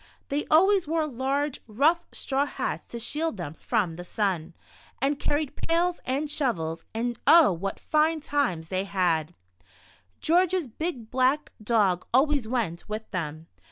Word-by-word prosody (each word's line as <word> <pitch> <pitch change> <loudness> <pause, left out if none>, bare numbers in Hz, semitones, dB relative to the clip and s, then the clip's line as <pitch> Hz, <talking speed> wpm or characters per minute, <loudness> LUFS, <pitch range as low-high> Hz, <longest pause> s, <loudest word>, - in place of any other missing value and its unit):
They 285 +2 -1
always 380 +2 +5
wore 320 0 +1
large, 275 +1 -1
rough 300 +10 +2
90 - - -43
The - - -14
Shadow. - - -4
straw 275 +1 +1
hats - - -4
to 235 - -7
shield 295 +3 -2
them 165 -5 -5
from 185 -3 -1
the 175 - -6
sun, 180 -3 -2 0.4
and 280 +1 0
carried 290 -1 -1
pails 345 +1 0
and 275 +4 -1
shovels, 170 - -2
and 235 +1 -2
oh, 330 -8 +8
what 195 +3 -4
fine 315 +1 +2
times 270 - -1
they 185 +1 -1
had! 175 -4 0 0.8
George's 360 +1 +2
big 245 -3 -5
black 260 +4 +2
dog 205 -5 +2
always 280 -3 +3
went 215 -8 -2
with 215 +1 -5
them. 160 -4 -4
255 Hz, 160 wpm, -27 LUFS, 190-300 Hz, 0.8 s, oh